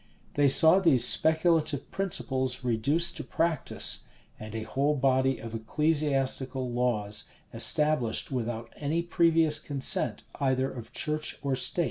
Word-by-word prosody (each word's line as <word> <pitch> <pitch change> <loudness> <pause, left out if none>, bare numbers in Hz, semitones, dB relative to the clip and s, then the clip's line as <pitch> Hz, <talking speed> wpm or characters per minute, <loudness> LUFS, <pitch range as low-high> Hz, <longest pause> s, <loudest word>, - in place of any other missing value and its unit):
They 145 -1 +2
saw 160 +7 +6
these 140 -10 +3
speculative 160 -1 +1
principles 130 -9 -1
reduced 140 +9 0
to 155 - -6
practice, 165 -1 0 0.3
and 110 +1 -9
a 110 - -4
whole 140 +6 -1
body 130 -1 +1
of 115 -1 -9
ecclesiastical 135 0 -1
laws 110 -4 -1 0.3
established 150 -7 +3
without 120 -2 -5
any 155 +4 -2
previous 165 -3 +2
consent 140 -3 -1 0.2
either 130 -1 0
of 115 -3 -10
church 155 0 -1
or 140 -2 -1
state. 130 +6 +1
135 Hz, 125 wpm, -27 LUFS, 125-155 Hz, 0.3 s, saw